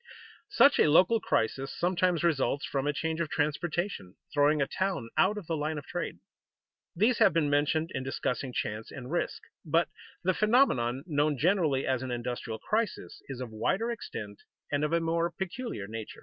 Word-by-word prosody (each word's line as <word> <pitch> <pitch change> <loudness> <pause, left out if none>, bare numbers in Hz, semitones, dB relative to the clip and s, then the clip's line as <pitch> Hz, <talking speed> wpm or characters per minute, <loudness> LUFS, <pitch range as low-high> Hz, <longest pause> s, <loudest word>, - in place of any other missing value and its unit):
Such 280 +4 +5
a - - +5
local 185 +9 +5
crisis 135 - 0
sometimes 180 -1 +1
results 145 -3 +1
from 135 0 -2
a - - +3
change 160 +2 -2
of 165 - -2
transportation, 155 - -2 0.2
throwing 150 +1 +4
a 140 - +3
town 185 -9 -2
out 205 +3 +3
of 205 - -6
the 165 - -1
line 155 +1 -2
of 145 - -6
trade. - - -4 0.8
These 220 +6 +3
have 190 - +6
been 155 -3 +2
mentioned 150 +3 +1
in - - -2
discussing 130 0 -2
chance 110 -2 -3
and 130 0 -8
risk; 175 - -2 0.2
but 165 +1 +2 0.3
the 185 +1 +2
phenomenon 175 - +2
known 150 -3 +1
generally 160 -4 +2
as 130 -2 0
an 130 - -4
industrial 120 -1 -4
crisis 210 - -2
is 135 -2 -5
of 125 -3 -5
wider 190 - 0
extent 105 - -7 0.3
and 145 0 +1
of 150 - 0
a 170 - +3
more 165 +1 0
peculiar 190 - -5
nature. 110 +1 -7
150 Hz, 180 wpm, -29 LUFS, 130-180 Hz, 0.8 s, have